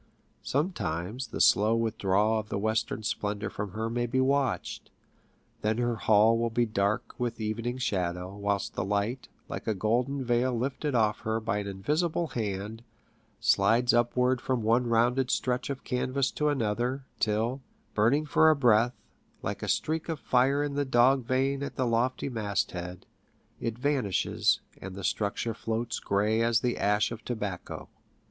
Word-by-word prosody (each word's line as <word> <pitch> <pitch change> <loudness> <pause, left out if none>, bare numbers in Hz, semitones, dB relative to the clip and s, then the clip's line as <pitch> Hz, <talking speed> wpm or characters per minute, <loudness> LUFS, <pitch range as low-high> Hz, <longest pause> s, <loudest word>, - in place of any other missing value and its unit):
Sometimes 125 - -2
the - - -6
slow 105 +3 +5
withdrawal 110 -1 +1
of 105 -1 -7
the - - -2
western 110 +1 -1
splendour 105 0 -2
from 100 -2 -5
her 110 +2 -2
may 120 +1 -1
be 130 +3 0
watched; 135 0 0 0.7
then 110 +1 0
her 120 -1 0
hull 110 +2 +4
will 115 0 +1
be 120 +1 +1
dark 105 -1 -1
with 120 -2 -2
evening 115 +3 -2
shadow, 90 -5 -2
whilst 100 -1 -1
the - - -2
light, 105 +6 -1 0.2
like - - -6
a 110 - +1
golden 125 +7 0
veil 120 +1 +1
lifted 135 +3 -2
off 110 -2 +2
her 110 0 -1
by 110 -2 -1
an 100 - -4
invisible 155 - -1
hand, 105 -1 -4 0.6
slides 120 +2 +3
upwards 125 +1 +2
from 125 -3 -1
one 120 +3 +3
rounded 120 +3 +2
stretch 125 +1 0
of 140 -1 -4
canvas 130 +1 0
to 150 0 0
another, 125 +1 -1
till, 110 +5 0 0.3
burning 120 +9 +3
for 160 +1 +5
a 155 - +5
breath, 120 -2 +3 0.5
like - - -3
a - - -4
streak 160 +1 -1
of 160 -3 -2
fire 135 +4 +2
in 145 -1 -2
the 145 0 0
dog 130 0 +3
vane 135 +2 +1
at 140 - -4
the 130 - 0
lofty 120 +3 0
mast 105 -6 -1
head, 90 0 -7 0.5
it 115 0 -3
vanishes, 130 -7 +1 0.2
and 95 0 -7
the 100 - -7
structure 105 +4 -1
floats 115 +1 -3
gray 105 +3 +1
as 115 0 +3
the 125 -1 0
ash 105 +2 +1
of 115 - -7
tobacco. 105 -7 -5
115 Hz, 165 wpm, -28 LUFS, 105-130 Hz, 0.7 s, slow